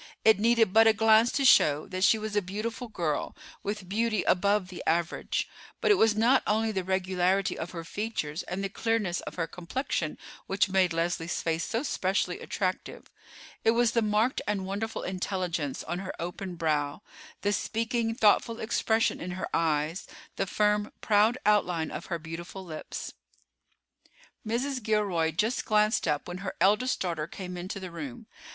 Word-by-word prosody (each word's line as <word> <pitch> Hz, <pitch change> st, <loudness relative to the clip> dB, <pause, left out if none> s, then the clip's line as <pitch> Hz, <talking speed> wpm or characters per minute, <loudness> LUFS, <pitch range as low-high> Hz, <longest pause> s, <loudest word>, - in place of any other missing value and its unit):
It 220 Hz, -2 st, +6 dB
needed 225 Hz, -3 st, +3 dB
but 225 Hz, +1 st, +7 dB
a 220 Hz, -, +6 dB
glance 220 Hz, +2 st, +5 dB
to 275 Hz, -, +1 dB
show 150 Hz, -, +5 dB
that 185 Hz, 0 st, -2 dB
she 220 Hz, -, +6 dB
was 215 Hz, -1 st, -5 dB
a 205 Hz, -, +3 dB
beautiful 215 Hz, +6 st, -4 dB
girl, 170 Hz, -9 st, -2 dB, 0.3 s
with 205 Hz, -2 st, -4 dB
beauty 215 Hz, +1 st, 0 dB
above 200 Hz, 0 st, +2 dB
the 180 Hz, -, -7 dB
average; 170 Hz, +1 st, 0 dB, 0.3 s
but -, -, +3 dB
it -, -, +9 dB
was 225 Hz, -, +4 dB
not 235 Hz, +5 st, +4 dB
only 220 Hz, +1 st, +2 dB
the 190 Hz, -3 st, -2 dB
regularity 190 Hz, +1 st, +1 dB
of 165 Hz, -, -5 dB
her 170 Hz, -2 st, -6 dB
features 165 Hz, -5 st, -3 dB
and 190 Hz, +2 st, -4 dB
the 195 Hz, -, -1 dB
clearness 210 Hz, -4 st, 0 dB
of -, -, -8 dB
her 165 Hz, -, -1 dB
complexion 180 Hz, -, -3 dB, 0.3 s
which 195 Hz, +1 st, +1 dB
made 185 Hz, -2 st, +3 dB
Leslie's 165 Hz, 0 st, -1 dB
face 165 Hz, 0 st, 0 dB
so 230 Hz, +3 st, -2 dB
specially 185 Hz, -8 st, -1 dB
attractive. 185 Hz, -2 st, -4 dB, 0.5 s
It 225 Hz, +1 st, +3 dB
was 240 Hz, -1 st, +4 dB
the 230 Hz, -, +2 dB
marked 215 Hz, +3 st, +1 dB
and 200 Hz, -2 st, -1 dB
wonderful 205 Hz, +4 st, -3 dB
intelligence 180 Hz, -6 st, -2 dB
on 175 Hz, +2 st, -3 dB
her 190 Hz, -1 st, -6 dB
open 175 Hz, +2 st, -5 dB
brow, 155 Hz, +1 st, -1 dB, 0.4 s
the 205 Hz, 0 st, +1 dB
speaking, 225 Hz, +2 st, -1 dB
thoughtful 225 Hz, +1 st, +3 dB
expression 220 Hz, 0 st, +1 dB
in 180 Hz, -, -4 dB
her -, -, -4 dB
eyes, 160 Hz, +1 st, 0 dB, 0.3 s
the -, -, -1 dB
firm, 210 Hz, +1 st, +1 dB
proud 215 Hz, +3 st, +3 dB
outline 180 Hz, -6 st, +2 dB
of -, -, -6 dB
her 170 Hz, -, -2 dB
beautiful 170 Hz, +4 st, -8 dB
lips. 155 Hz, -3 st, -6 dB, 1.3 s
Mrs. 255 Hz, +4 st, -1 dB
Gilroy 205 Hz, -7 st, +1 dB
just 210 Hz, +10 st, 0 dB
glanced 215 Hz, 0 st, +2 dB
up 145 Hz, -1 st, 0 dB
when 180 Hz, +1 st, -6 dB
her 195 Hz, 0 st, -5 dB
eldest 210 Hz, +8 st, +3 dB
daughter 165 Hz, -4 st, -2 dB
came 180 Hz, +1 st, -7 dB
into 180 Hz, +2 st, -5 dB
the 185 Hz, -2 st, -7 dB
room. 150 Hz, -7 st, -7 dB
195 Hz, 170 wpm, -28 LUFS, 175-220 Hz, 1.3 s, it